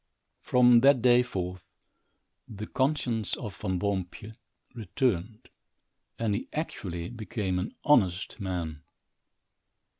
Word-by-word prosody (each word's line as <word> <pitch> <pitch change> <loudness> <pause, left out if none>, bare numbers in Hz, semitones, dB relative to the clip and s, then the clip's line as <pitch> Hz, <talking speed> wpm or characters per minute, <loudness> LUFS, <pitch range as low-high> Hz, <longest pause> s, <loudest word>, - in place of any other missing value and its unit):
From 125 -1 +5
that 135 -1 +5
day 125 -1 +6
forth 90 -6 -5 0.8
the 105 -1 -7
conscience 130 -5 0
of 105 -4 -6
Van 95 -3 -2
Boompjes 100 +2 -3 0.4
returned, 110 -1 -2 0.7
and 115 -3 0
he 100 - -3
actually 90 - -4
became 105 -5 -3
an 90 - -5
honest 100 - +2
man. 85 -6 -4
105 Hz, 100 wpm, -28 LUFS, 95-120 Hz, 0.8 s, day